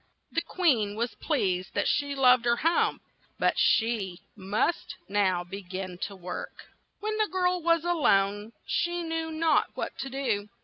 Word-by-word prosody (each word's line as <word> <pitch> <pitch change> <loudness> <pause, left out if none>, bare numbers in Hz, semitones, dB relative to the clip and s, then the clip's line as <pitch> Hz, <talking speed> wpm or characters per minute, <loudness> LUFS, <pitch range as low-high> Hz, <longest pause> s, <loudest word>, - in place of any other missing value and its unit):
The 330 - 0
queen 265 - +1
was 235 +2 -2
pleased 190 - -1
that - - +1
she 285 -1 0
loved 255 -2 +5
her 235 0 +4
home, 330 +7 +1 0.4
but - - +2
said - - +5
she 220 -6 -2
must 210 - -1
now 190 -3 +1
be 195 +3 -7
gin 185 -1 -6
to 200 - -11
work. 180 -1 -8 0.3
When 430 +1 -2
the 430 -1 +2
girl 360 -1 +1
was 335 0 +2
a 350 - +2
lone, 205 - +2
she 345 0 -1
knew 325 0 -2
not 315 -1 +2
what - - -4
to 270 - -4
do. 240 -7 -1
240 Hz, 170 wpm, -28 LUFS, 200-330 Hz, 0.4 s, loved